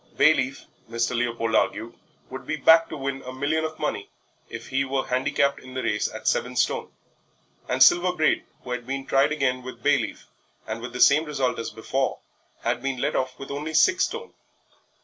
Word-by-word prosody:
Bayleaf, 140 -3 +3 0.2
Mr. 115 +1 -1
Leopold 115 -1 -1
argued, 115 +1 +1 0.4
would - - -8
be - - -1
backed 165 0 +5
to - - -6
win 135 0 -3
a 130 - -8
million 145 +5 -1
of 155 0 -4
money 105 -9 -3 0.4
if - - -8
he 135 +1 +1
were 135 0 -1
handicapped 140 +2 +1
in 130 0 -12
the 130 - -2
race 105 - 0
at - - -7
seven - - 0
stone; - - 0 0.8
and - - +5
Silver 180 +1 +5
Braid, 155 -3 +1 0.2
who 125 - -7
had 125 -1 -4
been 135 0 -3
tried 135 +2 +3
again 135 -4 0
with 125 -2 -10
Bayleaf, 145 -1 +1 0.4
and 110 +1 -5
with 125 +1 -7
the 125 - -5
same 150 +3 +6
result 135 -4 -1
as 115 - -3
before, 130 +5 -2 0.5
had - - 0
been 135 0 -2
let - - -1
off 130 0 -1
with 135 0 -8
only 150 +3 -4
six 375 - +5
stone. 470 0 -7
135 Hz, 190 wpm, -25 LUFS, 125-150 Hz, 0.8 s, same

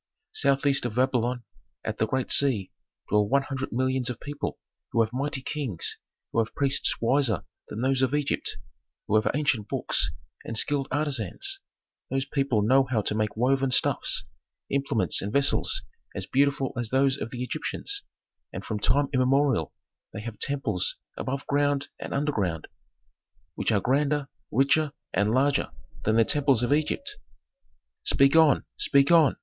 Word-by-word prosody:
"Southeast 140 0 +2
of 110 - -7
Babylon, 125 -1 +1 0.4
at - - -3
the 110 - +2
great 130 +1 -1
sea, 125 -9 +3 0.4
dwell 105 0 +2
one 140 +1 +3
hundred 135 -1 -4
millions 130 +1 0
of 125 - -5
people 145 0 -5 0.3
who 115 - +3
have 110 +1 -5
mighty 135 0 -2
kings, 130 - -2 0.3
who - - 0
have 115 0 -1
priests 140 -1 +2
wiser 120 - +2 0.2
than 110 - -6
those 135 0 +1
of 130 +2 +2
Egypt, 145 -1 -1 0.5
who - - -3
have 110 - +3
ancient 130 -8 0
books, - - +1 0.3
and 115 - -2
skilled 140 +2 +1
artisans. 150 - -1 0.5
Those 135 0 -1
people 135 -7 0
know 130 +5 +4
how 110 -5 +1
to - - -1
make 105 0 -1
woven 135 +3 +2
stuffs, 125 - +2 0.5
implements 125 - +1
and 100 - -4
vessels 140 +3 +2 0.3
as - - -3
beautiful 135 -1 +1
as 120 -2 -3
those 135 +1 +3
of 115 - -4
the 125 +1 -5
Egyptians, 280 - -3 0.5
and - - -7
from 105 -2 -3
time 140 +7 +2
immemorial 130 - +2 0.4
they 105 - -6
have 110 -1 -7
temples 135 -10 0 0.2
above 135 +1 -4
ground 145 0 +1
and - - -6
underground, 105 - -1 0.9
which - - -1
are 105 - +3
grander, 140 +4 0 0.2
richer, 140 +4 +2 0.2
and 100 +1 +2
larger 135 +4 +2 0.4
than 110 - +2
the 115 0 +5
temples 135 -4 +2
of 120 - +2
Egypt." 155 - -1 0.9
"Speak 140 +2 +4
on, 160 -4 +5
speak 140 +2 +3
on!" 165 -4 +5
135 Hz, 155 wpm, -26 LUFS, 115-140 Hz, 0.9 s, the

